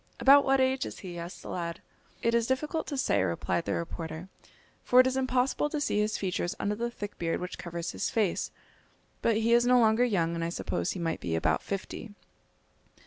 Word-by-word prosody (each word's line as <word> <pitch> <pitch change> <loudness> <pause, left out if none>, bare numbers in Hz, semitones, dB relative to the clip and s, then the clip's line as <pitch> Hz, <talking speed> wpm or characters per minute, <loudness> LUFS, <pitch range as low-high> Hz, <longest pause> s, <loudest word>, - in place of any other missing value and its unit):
"About 280 +1 +7
what 270 0 +3
age 260 0 +2
is - - -8
he?" 175 -3 -7
asked 170 +2 -8
the - - -8
lad. 170 -1 -4 0.4
"It 230 - +2
is 235 -1 +2
difficult 300 +5 -1
to 285 - -3
say," 260 - +2
replied 95 - -1
the - - -1
reporter; 165 +1 -5 0.5
"for 250 - +5
it 255 - +8
is 260 0 +1
impossible 260 +2 +1
to 300 - -2
see 265 -7 0
his 210 +1 0
features 180 -2 -2
under 205 - 0
the 235 +3 -2
thick 205 -3 -8
beard 165 -1 -1
which 180 0 -6
covers 170 0 -4
his - - -2
face; 210 -6 0 0.7
but 230 -2 +2
he 225 +1 +2
is 240 0 +5
no 250 0 +6
longer 220 +1 +4
young, 175 -9 +1
and 165 0 -2
I 165 - -1
suppose 175 - -2
he 190 - -6
might 165 -1 -1
be 85 -2 -2
about 80 - +1
fifty." 200 +1 -6
210 Hz, 210 wpm, -29 LUFS, 170-250 Hz, 0.7 s, it